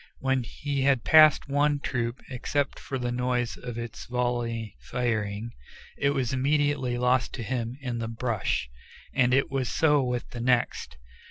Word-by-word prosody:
When 130 -1 +1
he 140 +4 -3
had 135 -3 +3
passed 155 -3 +6
one 145 +1 +2
troop, 120 -2 -3
except 140 +2 -2
for 135 - -4
the 120 -1 -2
noise 125 -1 -1
of 120 -2 -7
its 115 -1 -6
volley 120 -3 -2
firing, 110 -2 -2 0.4
it 140 - +1
was 135 -4 0
immediately 140 -2 +1
lost 125 -1 +2
to 120 - -5
him 120 +2 -3
in 125 -3 -3
the 115 - -3
brush, 115 - -1 0.5
and 125 -2 +3
it 135 +1 +2
was 135 -2 -1
so 150 -3 +3
with 125 -1 -2
the 120 - -6
next. 120 - 0
125 Hz, 160 wpm, -27 LUFS, 120-135 Hz, 0.5 s, passed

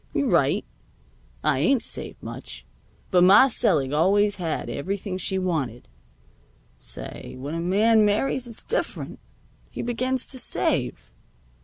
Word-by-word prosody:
You're 280 - +2
right; 150 -7 +2 0.8
I 130 - +2
ain't 230 - +3
saved - - -6
much. - - -8 0.5
But 180 -1 +5
Ma 200 +9 +8
selig 155 - +1
always 200 +6 +3
had 165 -4 -3
everything 190 +3 -3
she 190 +1 -1
wanted. 150 -11 -2 0.9
Say, - - -8
when 140 +4 -5
a 165 - -2
man 215 +6 +4
marries 240 +4 +1
it's 230 - -3
different. - - -3 0.5
He - - -5
begins 255 +2 -1
to 260 - -5
save." - - -1
195 Hz, 130 wpm, -25 LUFS, 165-230 Hz, 0.9 s, Ma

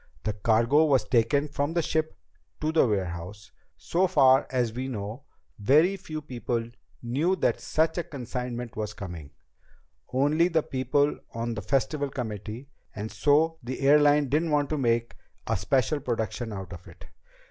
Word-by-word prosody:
The 105 - -1
cargo 115 +8 +3
was 140 -4 +3
taken 140 +5 +2
from 145 +2 -2
the 170 - +2
ship 155 +1 -1 0.4
to 155 +1 0
the 160 -5 +4
warehouse. 95 -1 -4 0.3
So 185 +3 +1
far 135 -6 +5
as 120 -4 0
we 130 +3 -4
know, 115 +2 -6 0.3
very 150 - +4
few 155 -5 -7
people 120 -3 -3 0.3
knew 145 +10 +1
that - - 0
such 160 +2 0
a - - -1
consignment 125 -5 -5
was 105 -2 -4
coming 85 -7 -8 0.8
only 145 +6 +3
the 165 -3 +1
people 135 +3 0 0.2
on 115 0 -2
the 105 - -5
Festival 140 +3 0
committee 115 0 -6 0.3
and 110 +1 -5
so 160 +3 +2
the 125 +3 -6
airline 145 +1 +5
didn't 155 +5 +1
want 145 -1 +1
to 155 - 0
make 115 -2 0 0.3
a - - 0
special 135 +3 +1
production 120 -3 -3
out 95 -2 -7
of 90 0 -11
it. - - -14
130 Hz, 160 wpm, -27 LUFS, 115-150 Hz, 0.8 s, far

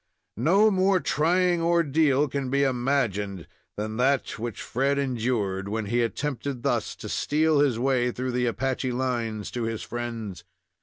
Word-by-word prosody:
No 200 - +5
more 190 0 +3
trying 175 +3 +2
ordeal 155 -4 +3
can 135 -1 -3
be 140 +1 +2
imagined 120 - 0 0.3
than 110 +1 -3
that 130 -1 +1
which 115 -1 -4
Fred 135 +3 0
endured 115 -7 -1
when 110 0 -2
he 120 +4 +1
attempted 130 +1 -3
thus - - 0
to - - -8
steal 155 0 +1
his 140 -5 +3
way 125 0 +1
through 125 +1 -3
the 125 0 0
Apache 130 +1 -1
lines 120 -4 -2
to 120 - -4
his 115 -1 -3
friends. 115 -6 -5
130 Hz, 150 wpm, -26 LUFS, 115-145 Hz, 0.3 s, No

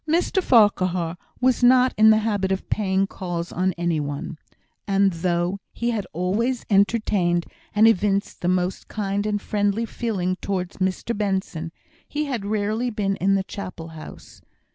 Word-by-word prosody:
Mr 345 +4 +1
Farquhar 185 - +3 0.2
was 255 0 +2
not 255 +1 +5
in 220 +1 +6
the 215 - +6
habit 205 -3 0
of 190 - -2
paying 195 -2 +1
calls 175 -3 -5
on 185 +1 0
any 170 -2 -1
one; 145 +3 -4 0.5
and 195 -1 +3
though 175 +2 -1
he 235 +1 -1
had 210 -5 -3
always 210 +9 -1
entertained 195 -4 +2 0.3
and 215 +2 +6
evinced 200 -2 +1
the 175 - -1
most 180 +1 0
kind 205 0 -2
and 205 -1 0
friendly 205 +2 0
feeling 195 -6 -2
towards 185 -3 -3
Mr 190 +5 -1
Benson, 190 -5 -2 0.4
he 300 +1 -2
had 245 -8 -3
rarely 215 +3 -1
been 205 -3 -1
in 195 +1 +2
the 195 - +1
Chapel 185 -4 -7
house. 160 -1 -12
195 Hz, 155 wpm, -23 LUFS, 180-215 Hz, 0.5 s, in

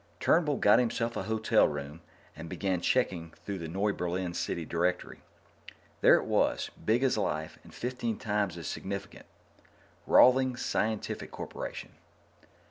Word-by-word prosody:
Turnbull 155 -4 +2
got 105 +3 +5
himself 115 -1 -1
a - - -2
hotel 110 0 +2
room 75 +2 -6 0.3
and 80 +1 -8
began 95 -2 -1
checking 85 -9 0
through 100 -2 -4
the 85 - -5
Noiberlin 90 -1 -2
city 85 -1 -3
directory. 90 +3 -2 0.8
There - - +7
it - - 0
was, - - +1
big 115 +4 +2
as 130 -5 +2
life 80 -5 -3
and - - -15
fifteen 120 -2 -3
times 105 -5 -1
as 85 - -7
significant. 100 0 -6 0.8
Rawlings 130 0 +5
Scientific 110 0 -2
Corporation. - - -7
100 Hz, 130 wpm, -30 LUFS, 85-115 Hz, 0.8 s, There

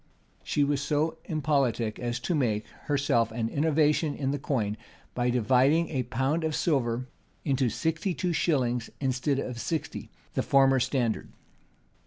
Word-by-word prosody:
[] - - -37
She 145 - +3
was 140 -1 +1
so 150 +3 0
impolitic 135 -8 0
as 120 -1 -2
to 175 - -1
make, 110 -8 0 0.2
herself, 140 -6 +1
an 115 0 -2
innovation 150 +1 +2
in 135 -1 -1
the 145 - -2
coin; 110 -7 -1 0.4
by 125 0 0
dividing 130 +7 +3
a 135 -5 -1
pound 135 +7 -1
of 160 -1 -1
silver 125 -5 0 0.4
into 135 -4 +2
sixty 165 - -1
two 180 -2 -1
shillings, 125 -7 +1
instead 135 +1 0
of 125 -3 -4
sixty, 160 +4 -3 0.2
the - - +1
former 135 -1 +4
standard. 125 -3 -1
135 Hz, 150 wpm, -28 LUFS, 120-150 Hz, 0.4 s, former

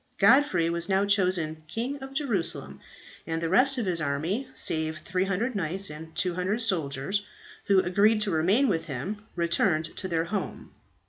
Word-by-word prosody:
Godfrey 200 - +4
was 170 +3 -2
now 195 +1 +2
chosen 180 -6 +1
King 245 - -4
of 270 0 -9
Jerusalem, 235 - -2 0.5
and 165 0 -2
the 165 0 -2
rest 260 +8 +5
of 235 - -1
his 175 -3 -1
army 160 - -2
save 160 0 +1
300 190 +9 -1
knights 190 -1 -2
and 160 +2 -10
200 185 +4 0
soldiers, 180 - 0 0.4
who 195 -2 +4
agreed 205 +4 +3
to 210 -2 +1
remain 190 - +3
with 165 -7 -1
him 170 +10 -5
returned 170 -1 +2
to 190 - -3
their 165 -2 0
home. 200 +3 -5
185 Hz, 155 wpm, -27 LUFS, 165-210 Hz, 0.5 s, rest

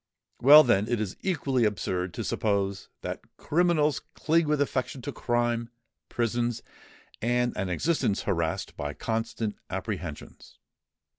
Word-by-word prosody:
Well, 150 +4 +10
then, 105 -5 +2
it 120 -2 0
is 105 -3 -3
equally 135 -9 0
absurd 95 -4 -1
to - - -3
suppose 100 -2 -1
that - - -5 0.2
criminals 155 -3 +2 0.2
cling 160 0 +2
with 150 -1 +1
affection 130 -2 -1
to 145 - -3
crime, 120 -2 0 0.4
prisons, 120 0 -1 0.6
and 120 +2 +1
an 95 - -2
existence 105 - 0
harassed 85 -4 -1
by 75 0 -4
constant 115 -1 -2
apprehensions. - - -6
120 Hz, 125 wpm, -27 LUFS, 105-140 Hz, 0.6 s, Well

